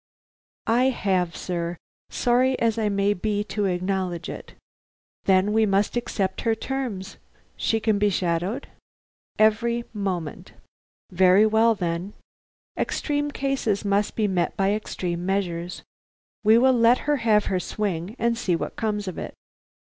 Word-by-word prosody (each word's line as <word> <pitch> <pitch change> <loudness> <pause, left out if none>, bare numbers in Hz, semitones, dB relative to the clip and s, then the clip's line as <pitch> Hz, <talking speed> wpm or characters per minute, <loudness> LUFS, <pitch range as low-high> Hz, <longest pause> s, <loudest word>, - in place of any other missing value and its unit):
"I 240 +3 +3
have, 190 -9 0
sir; 170 -1 -3 0.3
sorry 255 +2 +2
as 230 -1 +1
I 215 -1 +1
may 200 0 +2
be 205 +1 -1
to 210 -1 -2
acknowledge 185 -1 -2
it." - - -9 0.7
"Then 190 +2 +3
we 220 0 +3
must 200 +3 +1
accept 195 -5 -2
her 225 -1 +1
terms. 230 -6 -4 0.4
She 225 - 0
can 215 -2 +1
be 210 0 +3
shadowed?" 180 +7 -1 0.7
"Every 230 +2 +2
moment." 185 -7 -4 0.6
"Very 185 +3 +5
well, 220 +1 +4
then. 175 +1 -3 0.6
Extreme 290 -1 -1
cases 265 -7 -1
must 200 +1 +1
be 215 -2 +1
met 180 -3 -1
by 195 +1 +2
extreme 180 -5 -3
measures. 180 -2 -2 0.6
We 220 +1 +6
will 260 +2 +5
let 235 0 +4
her 295 0 +2
have 220 -4 +3
her 185 - 0
swing, 190 0 -3
and 235 0 +1
see 195 -7 0
what - - -4
comes 210 -2 -2
of 185 - -5
it. - - -6
205 Hz, 140 wpm, -24 LUFS, 185-230 Hz, 0.7 s, We